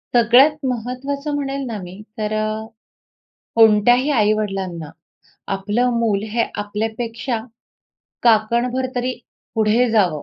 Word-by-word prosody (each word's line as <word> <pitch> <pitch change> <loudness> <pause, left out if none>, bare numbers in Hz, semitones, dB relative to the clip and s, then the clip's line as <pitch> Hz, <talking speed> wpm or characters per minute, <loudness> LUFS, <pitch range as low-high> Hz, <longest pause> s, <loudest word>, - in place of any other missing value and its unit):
सगळ्यात 265 +6 +5
महत्वाचं 265 +5 -4
म्हणेल 275 -1 -3
ना 225 -3 -4
मी 180 +3 -10 0.2
तर 215 -1 -2
अ, 215 0 -2 0.9
कोणत्याही 230 +4 +5
आई-वडिलांना 195 - 0 0.7
आपलं 210 +6 0
मूल 215 -4 +1
हे 230 +1 +1 0.2
आपल्यापेक्षा 225 +3 -3 0.8
काकणभर 235 +3 +2
तरी 250 +1 0 0.4
पुढे 220 +3 +3
जावं, 180 -9 +2
230 Hz, 100 wpm, -20 LUFS, 210-250 Hz, 0.9 s, सगळ्यात